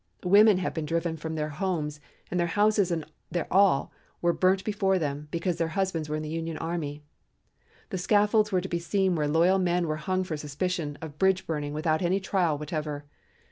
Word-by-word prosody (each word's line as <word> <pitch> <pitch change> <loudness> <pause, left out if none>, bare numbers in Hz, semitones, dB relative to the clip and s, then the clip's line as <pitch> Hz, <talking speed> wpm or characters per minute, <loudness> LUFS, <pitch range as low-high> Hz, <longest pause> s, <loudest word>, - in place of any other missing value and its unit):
Women 205 +2 +6
have 185 - -2
been 160 -2 -3
driven 165 0 -1
from 160 +1 -5
their 155 -1 -2
homes, 150 -2 -2 0.3
and 180 - 0
their 170 - +2
houses 205 +1 +2
and 165 -3 -2 0.2
their 175 -2 -2
all 190 -8 +4 0.3
were 170 0 +2
burnt 190 +2 +2
before 200 -3 +1
them, 150 -2 -3
because 170 +2 -1
their 165 -1 0
husbands 175 -6 -1
were 150 - -1
in 155 - -3
the 155 - -5
Union 165 0 -3
army. 155 -3 -4 0.9
The 185 - -2
scaffolds 210 +2 +3
were 185 -2 +2
to 190 - -5
be 170 -2 -2
seen 190 +2 +1
where 150 -3 0
loyal 170 +5 +3
men 175 -1 +1
were 155 0 -1
hung 185 +5 -1
for 165 -4 -4
suspicion 150 +1 -3
of 150 -2 -8
bridge 190 0 +2
burning 150 -2 -3
without 155 0 0
any 185 +2 +2
trial 185 -5 0
whatever. 150 -1 -4
170 Hz, 200 wpm, -27 LUFS, 155-190 Hz, 0.9 s, Women